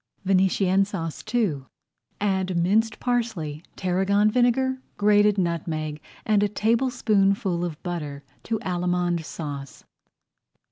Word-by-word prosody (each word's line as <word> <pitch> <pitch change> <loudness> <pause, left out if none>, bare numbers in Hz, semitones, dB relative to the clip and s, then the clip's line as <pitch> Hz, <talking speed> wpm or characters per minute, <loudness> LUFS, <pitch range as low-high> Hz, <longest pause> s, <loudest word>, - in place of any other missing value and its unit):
VENETIENNE 190 0 +3
SAUCE 165 -6 -5
II 190 - +1 0.6
Add 190 -3 0
minced 215 +6 +2
parsley, 220 -12 -2
tarragon 195 +3 +2
vinegar, 250 +2 +3
[Page 260 - -7
40] - - -34
grated 205 0 +4
nutmeg, 160 -4 -2 0.2
and 210 -2 +3
a 205 - +2
tablespoonful 205 -5 +1
of 165 -4 -5
butter 150 -6 -5 0.2
to 225 - -2
Allemande 175 -1 0
Sauce. 145 -4 -7
190 Hz, 110 wpm, -25 LUFS, 170-210 Hz, 0.6 s, grated